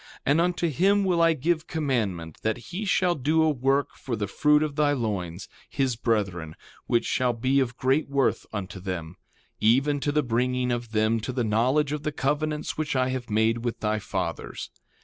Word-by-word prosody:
And 145 +4 +3
unto 175 0 +1
him 195 +7 +2
will 175 -3 +2
I 165 0 +5
give 160 +2 -1
commandment 110 - -2
that 110 +1 0 0.2
he 205 +4 -3
shall 180 -2 +2
do 160 +2 +2
a 160 - +3
work 135 +1 +1
for 125 - -4
the 105 -2 -2
fruit 150 +8 +3
of 150 -2 -3
thy 145 -1 +3
loins, 100 -8 -3 0.2
his 135 -3 0
brethren, 100 -9 -1 0.3
which 120 - +2
shall 125 -1 +1
be 130 +4 +1
of 125 -2 -1
great 135 +4 +1
worth 140 -1 +1
unto 100 -2 -5
them, 90 -2 -5 0.4
even 135 +6 +3
to 145 - 0
the 150 0 +1
bringing 125 +1 0
of 120 -2 -3
them 110 +1 +2
to 110 - -4
the 125 -1 -1
knowledge 125 +7 +2
of 150 -1 -2
the 150 - -2
covenants 150 +2 -2
which 150 -2 -1
I 130 0 +2
have 130 -2 -4
made 110 +2 +1
with 120 -1 -2
thy 110 0 0
fathers. - - -4
130 Hz, 190 wpm, -26 LUFS, 110-150 Hz, 0.4 s, I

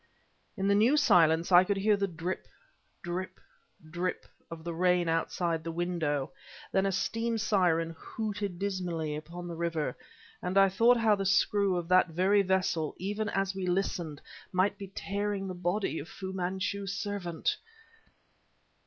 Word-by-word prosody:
In 195 0 0
the 200 - +4
new 230 +8 +4
silence, 170 - +4
I 180 0 +8
could 200 +1 -1
hear 210 +2 +3
the 200 0 0
drip, 175 +1 -5 0.6
drip, 180 +1 -4 0.5
drip 175 +3 -3 0.2
of 165 -1 -8
the 170 0 -4
rain 180 0 +2
outside 165 0 0
the 165 - -4
window; 165 -5 -1 0.4
then 190 0 +2
a - - +1
steam 230 +4 -1
siren 175 -6 +1
hooted 205 0 -4
dismally 175 -6 -2
upon 170 +3 -7
the 170 - -5
river, 165 -2 -2 0.5
and 180 +2 -1
I 195 0 +7
thought 230 +6 +4
how 225 -2 +4
the 195 -1 0
screw 195 0 +3
of 175 -1 -3
that 185 0 +5
very 185 +5 +3
vessel, 185 -5 0
even 205 +3 -2
as 195 -1 0
we 190 -1 -3
listened, 175 -5 -2 0.3
might 185 +2 +2
be 200 - -8
tearing 200 0 -3
the 185 - -4
body 175 0 -1
of 150 - -8
Fu 190 0 -6
Manchu's 190 +2 -2
servant! 200 -4 -2
185 Hz, 155 wpm, -30 LUFS, 170-200 Hz, 0.6 s, I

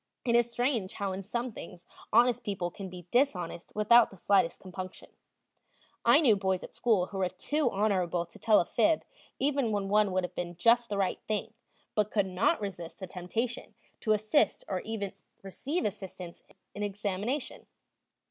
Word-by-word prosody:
It 235 -1 +3
is 240 0 +3
strange 240 -5 0
how 200 -2 -2
in 190 +1 -4
some 235 +5 -3
things 180 -4 -10 0.3
honest 240 +1 +4
people 190 -4 -2
can 190 +1 -7
be 180 -1 -10
dishonest 185 -10 0
without 220 +3 +6
the 195 - -14
slightest 185 -2 +2
compunction. 185 0 -8 0.9
I 235 +5 +6
knew 240 -9 +5
boys 190 -2 -1
at - - -10
school 215 -7 +2
who 195 +1 -6
were 185 -1 +1
too 285 - 0
honorable 185 -5 0
to 170 - -17
tell 215 -2 +5
a - - +1
fib 315 - +2 0.3
even 275 -4 +1
when 200 -2 -1
one 210 -1 +3
would 185 0 +1
have 180 - -4
been 175 0 -4
just 235 +5 +4
the 205 - -2
right 195 -2 0
thing, 215 0 -2 0.4
but 210 -1 +1
could 205 -3 +1
not 190 +4 +1
resist 185 -5 -6
the 190 - -6
temptation 220 +7 -4 0.2
to 215 - +2
assist 215 +8 +2
or 185 -2 -2 0.6
receive 280 - -3
assistance 190 -4 -6
in - - -22 0.2
an - - -4
examination. 205 +7 -3
205 Hz, 175 wpm, -30 LUFS, 185-235 Hz, 0.9 s, without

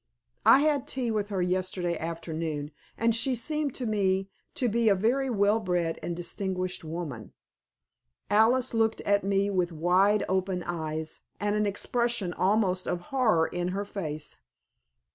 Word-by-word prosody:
I 270 - +8
had 295 -3 +1
tea 250 -3 -1
with 210 -2 -1
her 190 -3 0
yesterday 180 -1 -1
afternoon, 160 -2 -4 0.3
and 230 0 +2
she 250 +3 +1
seemed 300 +3 -1
to 255 - -3
me 195 -3 0 0.2
to 250 - +1
be 230 0 +2
a 200 - +5
very 250 +7 +1
well 210 -1 +3
bred 175 -5 -1
and 170 - -3
distinguished 185 +1 -3
woman." 155 - -6 0.9
Alice 235 +5 +3
looked 225 -1 +1
at 205 0 +2
me 200 +1 +1
with 180 -2 0
wide 185 +6 +3
open 185 -1 -1
eyes, 160 -2 -4 0.2
and 205 0 0
an 210 0 +1
expression 235 -2 0
almost 190 -2 +1
of 175 - -1
horror 220 -11 +3
in 175 +1 -3
her 200 - -2
face. 155 -7 -6
195 Hz, 150 wpm, -28 LUFS, 175-225 Hz, 0.9 s, I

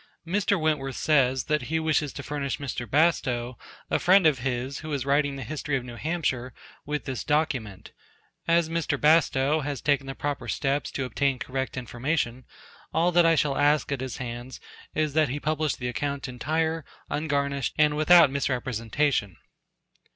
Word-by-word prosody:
Mr. 200 +2 +1
Wentworth 150 -4 0
says, 130 -4 +2
that 150 -1 0
he 160 0 +1
wishes 155 -2 +1
to 145 - -8
furnish 140 -1 -3
Mr. 125 -4 -5
Bastow, 130 -5 +1 0.4
a - - +2
friend 185 0 +5
of 150 -5 +4
his, 130 +1 -3
who 155 -1 -7
is 135 -3 -2
writing 140 0 +2
the 135 - -6
history 145 +2 -2
of 130 - -5
New 120 -1 -9
Hampshire, 130 -4 -2 0.3
with 150 0 -3
this 130 -3 -4
document. 130 -10 -1 0.6
As 170 -1 +3
Mr. 160 -3 -1
Bastow 150 -1 +3
has 145 -2 -3
taken 140 0 +1
the 135 - -5
proper 145 -1 -3
steps 140 0 -1
to 135 - -2
obtain 135 +2 0
correct 130 +1 -4
information, 125 0 -2 0.5
all 175 +2 +2
that 175 -1 +5
I 165 - +5
shall 145 -3 +1
ask 145 +1 +2
at 140 -2 -2
his 130 -2 -5
hands 120 +1 -6 0.4
is 155 -2 0
that 155 -2 +3
he 140 +4 -3
publish 155 0 0
the 125 - -4
account 140 +4 -3
entire, 160 +6 -1 0.3
ungarnished, 140 -3 -1
and 150 -1 +4
without 155 -1 +6
misrepresentation. 125 - -1
140 Hz, 165 wpm, -26 LUFS, 130-155 Hz, 0.6 s, without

